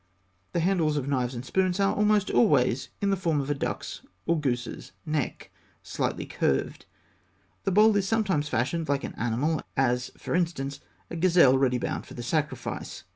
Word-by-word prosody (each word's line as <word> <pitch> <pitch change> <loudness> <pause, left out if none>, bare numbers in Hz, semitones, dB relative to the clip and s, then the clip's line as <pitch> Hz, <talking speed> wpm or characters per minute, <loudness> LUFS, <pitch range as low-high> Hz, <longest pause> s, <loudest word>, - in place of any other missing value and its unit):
The 170 - +1
handles 165 -4 +2
of 140 -2 -2
knives 130 -3 0
and 120 +2 -6
spoons 185 +4 +1
are 195 0 +3
almost 210 -1 +2
always 135 - +3
in 200 -1 +2
the - - +3
form 165 -5 0
of 140 +1 -2
a - - +3
duck's 140 - -4 0.2
or 170 -1 +2
goose's 120 -8 -3
neck, 155 -3 -3 0.3
slightly - - -2
curved. 70 - -1 0.8
The 195 - +1
bowl 210 +3 +5
is 195 -1 +1
sometimes 195 -9 +1
fashioned 140 +7 -1
like 140 -1 +1
an - - -5
animal 130 +7 0 0.2
as, 125 -2 +1
for - - -5
instance, 145 -6 -1 0.3
a - - -4
gazelle 170 -6 +5
ready 130 -2 +2
bound - - -3
for - - -11
the 120 - -6
sacrifice 150 +4 -3
(fig. - - -30
150 Hz, 180 wpm, -27 LUFS, 130-185 Hz, 0.8 s, bowl